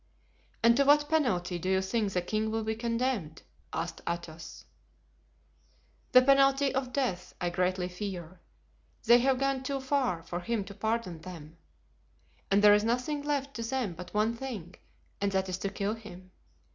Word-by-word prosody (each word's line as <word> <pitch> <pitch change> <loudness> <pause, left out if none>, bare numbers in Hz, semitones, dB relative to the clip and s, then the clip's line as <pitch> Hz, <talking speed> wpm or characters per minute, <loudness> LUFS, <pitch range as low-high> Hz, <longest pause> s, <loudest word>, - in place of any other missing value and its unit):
"And 235 0 +6
to 280 - +5
what 295 +1 +4
penalty 185 - +1
do 185 - -3
you 190 0 +3
think 200 +2 -1
the 180 -2 -1
king 215 +3 -1
will 225 0 -1
be 220 0 -1
condemned?" 230 -7 -2 0.3
asked 165 +2 -4
Athos. 170 -1 -6 1.5
"The 255 - +8
penalty 275 0 +4
of 260 -1 -2
death, 250 -10 -2
I 175 0 -1
greatly 180 +1 0
fear; 180 -2 -6 0.6
they 240 +1 +7
have 265 +1 +2
gone 275 0 0
too 275 +1 -2
far 265 - 0
for 175 +1 -4
him 215 +3 -2
to 200 +1 -10
pardon 220 -4 -2
them, 160 -3 -10 0.9
and 200 +1 +3
there 205 0 +9
is 210 0 +4
nothing 250 +6 0
left 285 -1 -2
to - - -4
them 230 -4 -2
but 180 +2 -9
one 215 +2 +1
thing, 230 -9 -6 0.5
and 200 0 +1
that 190 0 +1
is 185 0 -3
to 200 - -2
kill 200 +1 -2
him. 185 -5 -11
215 Hz, 170 wpm, -30 LUFS, 180-260 Hz, 1.5 s, there